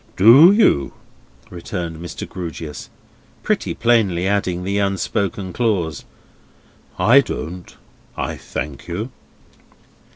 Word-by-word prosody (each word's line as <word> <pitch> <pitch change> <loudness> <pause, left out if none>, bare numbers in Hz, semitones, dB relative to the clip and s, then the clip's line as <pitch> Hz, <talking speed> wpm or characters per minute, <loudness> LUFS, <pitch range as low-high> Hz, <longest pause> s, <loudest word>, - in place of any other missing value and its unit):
"Do 125 - +8
you?" 200 - +3 0.6
returned 85 -2 -5
Mr. 85 0 -7
Grewgious, 80 -4 -7 0.5
pretty - - -1
plainly 110 -7 +2
adding 95 -3 -1
the 100 +2 -1
unspoken 100 -1 -2
clause: 95 - -1 0.9
"I 115 +10 +6
don't, 90 -5 -7 0.4
I - - -3
thank 70 -1 -6
you!" 105 +9 -4
95 Hz, 95 wpm, -20 LUFS, 85-110 Hz, 0.9 s, Do